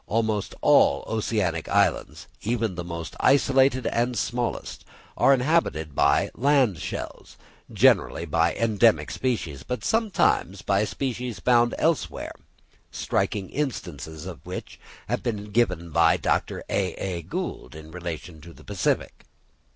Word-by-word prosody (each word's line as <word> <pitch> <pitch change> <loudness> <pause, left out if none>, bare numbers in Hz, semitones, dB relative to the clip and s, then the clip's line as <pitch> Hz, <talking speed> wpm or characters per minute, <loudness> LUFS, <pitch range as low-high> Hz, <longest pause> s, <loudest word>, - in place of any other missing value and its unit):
Almost 110 -2 -1
all - - +4
oceanic 105 -7 -1
islands, - - +1 0.2
even 115 -2 -1
the 85 0 -5
most 85 -1 -6
isolated 135 -1 +3
and 120 +1 0
smallest, 120 +3 -3 0.3
are - - +4
inhabited 125 - +1
by - - +2
land 130 - +2
shells, - - -7 0.3
generally 85 - +3
by 85 +2 +1
endemic 115 0 +2
species, 95 - -2
but 125 - -5
sometimes 205 - +1
by 100 +2 +2
species 125 -2 -4
found 120 +3 +3
elsewhere 165 -3 -1 0.6
striking 100 -3 -2
instances 80 - -4
of 90 -3 -8
which - - -7 0.3
have - - -1
been 105 -3 -4
given 90 -7 0
by 80 0 +4
Dr. - - -1
A.A. 90 -2 -2
Gould 65 -4 -5
in 80 0 -11
relation 85 -2 -7
to 85 +2 -12
the - - -16
Pacific. 100 -3 -2
105 Hz, 125 wpm, -25 LUFS, 85-125 Hz, 0.6 s, all